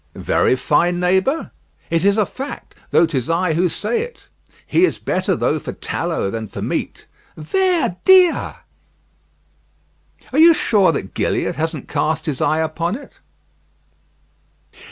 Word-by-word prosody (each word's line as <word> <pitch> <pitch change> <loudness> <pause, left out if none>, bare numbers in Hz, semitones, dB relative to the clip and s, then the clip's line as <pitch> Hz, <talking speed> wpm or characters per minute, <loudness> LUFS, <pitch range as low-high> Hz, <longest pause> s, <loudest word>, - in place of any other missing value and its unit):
"Very - - +1
fine, 175 +6 +1
neighbour?" 190 - +1 0.4
"It 165 0 +1
is 200 +1 +3
a 215 - +3
fact, 270 +7 -8 0.2
tho' - - +4
'tis 135 -6 -3
I 165 0 +1
who 175 +3 +1
say 210 +8 -2
it; 480 0 -9 0.4
he 345 - +2
is 370 - +2
better - - -1
though - - 0
for - - -7
tallow 165 - -3
than 110 -1 -5
for - - -9
meat." - - -4 0.3
"Ver 340 - 0
dia!" 370 -3 +4 1.7
"Are 285 - +2
you 330 +1 +8
sure 200 - +3
that 120 -10 -5
Gilliatt - - -1
hasn't 160 -3 -3
cast 155 +1 -1
his 150 -6 -3
eye 155 +1 +2
upon 165 +4 -2
it?" 280 - -11
175 Hz, 140 wpm, -19 LUFS, 160-265 Hz, 1.7 s, you